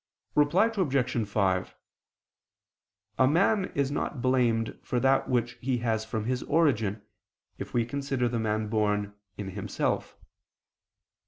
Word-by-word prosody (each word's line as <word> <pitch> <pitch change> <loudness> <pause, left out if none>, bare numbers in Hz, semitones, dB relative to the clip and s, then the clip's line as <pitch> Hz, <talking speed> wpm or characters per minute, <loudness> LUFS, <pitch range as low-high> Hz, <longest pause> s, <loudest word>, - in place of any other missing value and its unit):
Reply 150 +8 +4
Obj. 130 - 0
5: 95 -3 0 1.4
A 130 - +6
man 190 +6 +3
is 140 -1 +1
not 145 -1 -2
blamed 120 -3 +1
for 125 - -1
that 135 +2 +2
which 120 -1 0
he 130 0 0
has 110 -1 0
from 110 -1 -3
his 125 +1 -1
origin, 115 -10 +1 0.6
if - - -6
we 120 -1 +2
consider 135 0 -1
the 120 0 -1
man 110 0 -1
born, 105 -1 0 0.2
in 100 -2 -5
himself. 100 +1 -2
120 Hz, 130 wpm, -28 LUFS, 110-135 Hz, 1.4 s, A